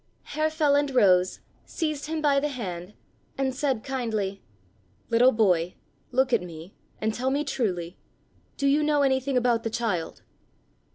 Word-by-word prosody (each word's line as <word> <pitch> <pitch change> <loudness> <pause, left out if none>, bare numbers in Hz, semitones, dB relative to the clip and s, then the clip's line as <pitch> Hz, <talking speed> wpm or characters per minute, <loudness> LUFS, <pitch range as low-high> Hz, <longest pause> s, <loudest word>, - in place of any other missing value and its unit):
Herr 310 +1 -1
Feland 290 -3 +2
rose, 185 -6 +4 0.2
seized 305 -3 -3
him 315 0 -3
by 280 -2 +4
the 295 - 0
hand, 195 -8 -6 0.4
and 265 -1 0
said 265 -4 -1
kindly: 220 -7 -2 0.7
"Little 245 +3 +6
boy, 180 -6 +2 0.4
look 260 0 +2
at - - +4
me, 170 +1 -10 0.3
and 220 0 0
tell 255 +3 -1
me 285 +2 0
truly, 185 - -2 0.6
do 280 - -1
you 280 +2 +4
know 295 -1 +2
anything 265 0 +1
about 240 -2 +2
the 225 - -2
child?" 220 -8 -3
250 Hz, 150 wpm, -26 LUFS, 200-280 Hz, 0.7 s, Little